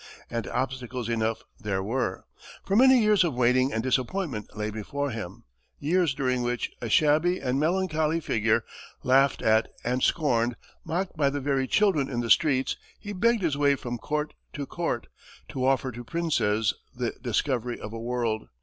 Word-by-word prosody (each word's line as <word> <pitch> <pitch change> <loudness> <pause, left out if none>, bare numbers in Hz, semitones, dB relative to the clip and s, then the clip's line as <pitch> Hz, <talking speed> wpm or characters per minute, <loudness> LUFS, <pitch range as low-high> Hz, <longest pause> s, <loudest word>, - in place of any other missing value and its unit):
And 115 -4 -3
obstacles 125 -1 -3
enough 115 -1 -1 0.2
there 95 -2 -2
were, 110 -3 -2 0.4
for 195 - 0
many 260 +3 +7
years 210 -3 +4
of 160 -7 -1
waiting 130 +2 +3
and 110 - -1
disappointment 130 - -2
lay 105 0 -2
before 140 +7 -3
him 105 -5 -7 0.3
years 165 -1 +1
during 130 -2 0
which, 120 0 -2
a 120 - -3
shabby 155 +8 +3
and 130 +2 -1
melancholy 160 -1 +1
figure, 115 -6 +1 0.4
laughed 135 +1 +3
at 110 0 +4 0.2
and 125 +2 0
scorned, 120 -7 +2 0.3
mocked 180 +3 -2
by 145 -3 +2
the 145 +1 -2
very 135 -1 0
children 175 -9 +2
in 120 - -2
the 115 - -1
streets, 135 -5 +3 0.2
he 205 -1 -6
"begged 230 +2 +2
his 155 -5 +1
way 140 -1 +4
from 120 -2 -5
court 150 +3 -2 0.2
to 145 - -4
court, 165 -6 -2 0.4
to 130 -1 -1
offer 135 -1 +1
to 120 +1 -8
princes 115 -9 +1 0.2
the - - -1
discovery 125 -4 -1
of 110 - -7
a 115 - -5
world." 115 -2 -2
130 Hz, 170 wpm, -27 LUFS, 115-155 Hz, 0.4 s, many